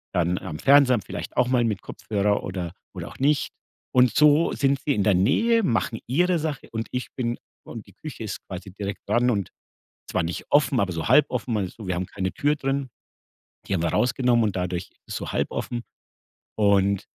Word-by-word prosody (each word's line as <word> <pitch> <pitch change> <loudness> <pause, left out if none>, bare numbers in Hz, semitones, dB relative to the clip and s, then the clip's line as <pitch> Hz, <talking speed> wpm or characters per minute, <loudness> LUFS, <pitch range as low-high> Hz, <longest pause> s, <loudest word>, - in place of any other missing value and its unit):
dann 90 0 +1
am 75 - -6
Fernseher 140 -2 +6
am 105 - -2
vielleicht 95 - -7
auch 125 - +4
mal 125 -2 +2
mit 110 -5 -1
Kopfhörer 105 -1 -1
oder 90 -2 -4 0.2
oder - - -6
auch - - -11
nicht 145 +2 +2 0.4
und 125 -1 +4
so 150 +2 +5
sind 140 -1 +1
sie 145 - +1
in 100 - +1
der 105 - +4
Nähe, 230 - +3
machen 115 - 0
ihre 175 +6 +2
Sache 150 -4 -4
und 110 0 -3
ich 125 0 -3
bin 120 -2 -2 0.3
und 115 -3 -8
die 100 - -17
Küche 145 0 -8
ist 105 - -5
quasi 95 +1 -7
direkt 100 +1 -6
dran 120 +4 +3
und 100 -6 -1 0.6
zwar 95 - +1
nicht 85 +1 -4
offen, 145 -3 +3
aber 95 -2 0
so 80 -2 -3
halb 150 - +6
offen 125 -2 -2
also, 100 +1 -4
wir 90 - -1
haben 90 +1 -2
keine 95 -1 -3
Tür 145 +1 +1
drin. 135 -1 -2 0.8
Die - - -1
haben 85 -2 0
wir - - +1
rausgenommen 125 -1 +2
und 100 - -2
dadurch 90 0 -3
ist - - -36
es - - -5
so - - -4
halb - - 0
offen 120 -1 -3 0.8
und 100 -2 +3
115 Hz, 205 wpm, -24 LUFS, 95-135 Hz, 0.8 s, Fernseher